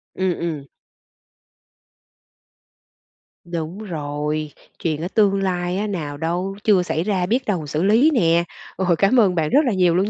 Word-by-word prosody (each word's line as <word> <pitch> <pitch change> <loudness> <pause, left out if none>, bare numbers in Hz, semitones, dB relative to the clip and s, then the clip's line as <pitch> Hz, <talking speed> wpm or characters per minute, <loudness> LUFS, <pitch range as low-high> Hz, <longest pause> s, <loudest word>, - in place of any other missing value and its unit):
Ừm, 185 -2 -1
ừm. 155 -5 -4 2.8
Đúng 170 +2 -5
rồi, 150 -5 -3 0.3
chuyện 155 -2 -2
ở 175 - -2
tương 195 -1 +2
lai 180 -1 -1
á, 210 +2 -1
nào 150 -7 -4
đâu, 175 +5 -2
chưa 195 -4 +4
xảy 165 -2 -1
ra, 190 -2 0
biết 245 +7 0
đâu 175 -8 -2
xử 155 +4 -1
lý 230 +10 +4
nè. 170 - +3 0.3
Ôi! 180 -3 +1
Cảm 220 +6 +4
ơn 190 -5 +3
bạn 155 -2 0
rất 290 - +5
là 240 - +1
nhiều 180 -2 +3
luôn 195 +3 +1
180 Hz, 160 wpm, -21 LUFS, 160-200 Hz, 2.8 s, rất